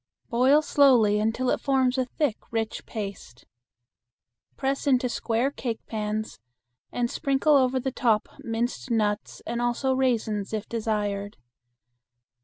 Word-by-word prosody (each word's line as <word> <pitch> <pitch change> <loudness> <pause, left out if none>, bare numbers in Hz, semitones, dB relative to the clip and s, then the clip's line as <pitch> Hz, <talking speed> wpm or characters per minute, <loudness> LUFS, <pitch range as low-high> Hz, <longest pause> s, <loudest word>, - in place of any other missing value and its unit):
Boil 265 +6 +4
slowly 245 -9 +4
until 225 +4 0
it - - -1
forms 265 -2 +2
a 260 -1 +1
thick 255 -2 -1
rich 225 -1 -3
paste. 200 - -7 1.1
Press 275 +1 -1
into 255 -2 +3
square 235 +2 0
cake 235 -5 -5
pans 215 - -4 0.5
and 240 -1 0
sprinkle 275 +2 +2
over 260 -1 +3
the 265 +1 -2
top 225 -4 +1
minced 235 +3 -3
nuts 210 -2 -1
and 235 +1 -2
also 240 +2 +1
raisins, 225 -6 0
if 215 -1 -3
desired. 210 -3 -2
235 Hz, 125 wpm, -26 LUFS, 215-260 Hz, 1.1 s, Boil